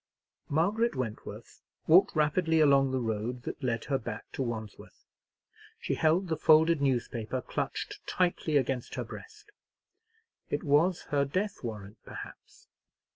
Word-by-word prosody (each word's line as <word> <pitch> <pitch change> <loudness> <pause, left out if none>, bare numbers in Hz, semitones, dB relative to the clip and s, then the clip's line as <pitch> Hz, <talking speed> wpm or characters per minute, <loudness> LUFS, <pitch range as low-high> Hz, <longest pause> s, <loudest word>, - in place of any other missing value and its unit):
Margaret 205 +10 +1
Wentworth 120 -4 -6 0.2
walked 185 +4 +5
rapidly 160 +2 +2
along 140 -3 +5
the 130 - -1
road 115 +2 -3
that - - -6
led 115 -3 -1
her 135 -2 0
back 110 0 -7
to - - -4
Wandsworth. 110 -4 -6 0.7
She - - -2
held 165 +4 +2
the 160 -2 -1
folded 160 0 +5
newspaper 125 -2 -1
clutched - - -4
tightly 175 -4 +1
against 130 -2 -1
her - - -2
breast. 440 -1 -12 1.0
It - - -2
was 165 +4 +3
her 140 -1 +3
death 185 +8 -2
warrant, 105 -2 -7
perhaps. - - -11
140 Hz, 130 wpm, -30 LUFS, 120-165 Hz, 1.0 s, walked